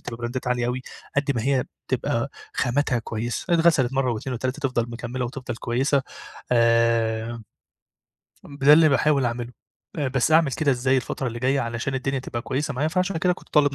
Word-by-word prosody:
تبقى 115 - -7
براندات 120 +2 -3
عالية 125 -1 0
أوي، 125 +1 -2 0.3
قد 140 0 +2
ما 115 - 0
هي 135 -1 +1 0.2
تبقى - - -1 0.2
خاماتها 125 +1 +1
كويسة. 115 +9 -2
اتغسلت 160 -7 +3
مرّة 135 -2 +1
و2 125 +3 -4
و3 130 +4 -3
تفضل 120 -2 -1
مكمِّلة 120 +2 -4
وتفضل 125 -1 -5
كويسة، 130 +4 +1 0.5
آآ 115 -1 +2 1.0
ده 140 0 +4
اللي 155 +1 +7
باحاول 140 -1 +3
أعمله. 120 0 -3 0.5
آآ 145 -3 0
بس 135 +3 +1
أعمل 160 -3 +5
كده 150 0 +1
إزاي 130 +1 +1
الفترة 130 +1 -2
اللي 115 - -6
جايّة 135 +3 +1
علشان 115 +3 -3
الدنيا 135 +1 -1
تبقى 120 -2 -5
كويسة 140 +1 -2
معايا 145 +5 0
فعشان 185 +2 0
كده 180 +2 +2
كنت 180 - -11
طالب 145 -2 +3
130 Hz, 175 wpm, -24 LUFS, 120-140 Hz, 1.0 s, اللي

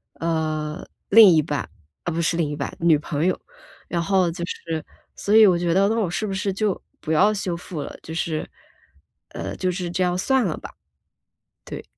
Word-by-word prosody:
呃， 155 -2 -2 0.3
另 215 -1 +9
一 160 -3 +5
半 145 - -3 0.4
呃， 175 - -1
不 165 - -2
是 165 +1 +1
另 165 -3 0
一 145 - -3
半， 140 - -4
女 165 -2 +4
朋 150 +2 -1
友。 185 - 0 0.5
然 170 - -1
后 185 -1 +2
就 170 +1 -6
是 165 -3 -4 0.3
所 205 - +1
以 220 0 +9
我 180 -2 +4
觉 170 -1 +1
得 195 +1 +4
那 225 - +1
我 200 -6 0
是 175 +5 -2
不 195 - -3
是 195 +1 -1
就 205 0 -1 0.2
不 155 - -4
要 195 +7 +5
修 190 -4 -2
复 170 -2 -6
了， - - -8
就 - - -9
是， 160 -1 -2 0.9
呃， - - -5
就 185 -1 -1
是 175 -1 -4
这 175 +2 -2
样 180 0 +1
算 265 +7 +2
了 170 - -2
吧， - - -9 0.9
对。 - - -7
175 Hz, 220 characters per minute, -23 LUFS, 160-190 Hz, 0.9 s, 另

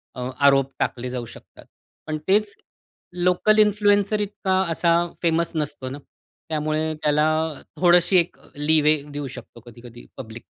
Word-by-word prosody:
अ, 125 - -6 0.2
आरोप 135 -1 +4
टाकले 125 0 -2
जाऊ 125 -1 -5
शकतात. - - -15 0.4
पण 155 0 -2
तेच 205 +2 +2 0.7
लोकल 180 +4 +3
इन्फ्लुएन्सर 205 0 +3
इतका 195 -2 -1
असा 170 +1 +1 0.3
फेमस 170 0 +1
नसतो 145 -4 -3
ना. 135 - -7 0.5
त्यामुळे 155 0 -1
त्याला 150 +1 +3 0.5
थोडशी 180 +1 +4
एक 175 0 0 0.2
लीवे 150 0 +3
देऊ 145 -1 -4
शकतो, 125 -2 -11
कधी 120 0 -14
कधी 120 0 -13
पब्लिक. 115 -2 -10
155 Hz, 135 wpm, -22 LUFS, 135-180 Hz, 0.7 s, आरोप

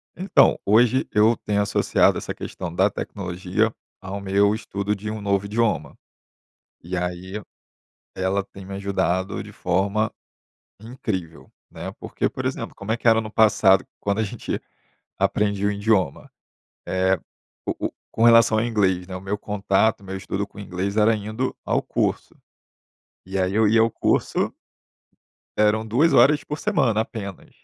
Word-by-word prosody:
Então, 185 +3 +4
hoje 120 +5 +4
eu 110 +2 +4
tenho 105 -1 -1
associado 100 - +2
essa - - -4
questão 90 -3 -6
da 95 +4 +3
tecnologia 95 +3 -2 0.3
ao 95 +1 -5
meu 100 +1 +3
estudo 105 -1 -3
de 105 +1 -6
um 110 -1 -5
novo 100 -1 0
idioma, 105 - 0 0.9
e 90 +3 -4
aí 90 +3 -4 0.7
ela 95 +1 0
tem 95 0 -13
me 95 - -8
ajudado 95 -1 -1
de - - -11
forma 100 +4 0 0.7
incrível, 100 -7 -5 0.2
né. - - -6
Porque, - - -2
por - - -6
exemplo, - - -3
como 100 +2 -5
é 115 - +1
que 120 - -2
era 115 0 +5
no 110 -1 -7
passado, 105 -4 +4
quando 100 +1 -1
a - - +2
gente 100 - -4 0.6
aprendia 100 -1 +1
o - - +1
idioma. 100 -7 0 0.6
Eh, 95 0 +1 0.5
o - - -2
o - - -18 0.2
com 115 - +2
relação 115 -1 +6
ao 110 - +1
inglês, 95 -6 +1
né, 90 -1 -6
o 95 - -8
meu 100 +2 -3
contato, 105 +1 +1
o - - -14
meu 95 0 -5
estudo 100 +1 -3
com 100 - -17
inglês, 100 +1 -3
era 110 +1 +4
indo 110 +5 -3
ao - - +1
curso. - - -2 0.9
E 95 +1 -3
aí 95 +2 0
eu 110 -1 +4
ia 110 +2 +4
ao 115 - +3
curso - - 0 1.0
eram 105 +1 +3
2 140 +10 +3
horas 150 +2 +5
por 150 - -5
semana, 140 - +2
apenas. 100 -4 -7
100 Hz, 160 wpm, -23 LUFS, 95-110 Hz, 1.0 s, relação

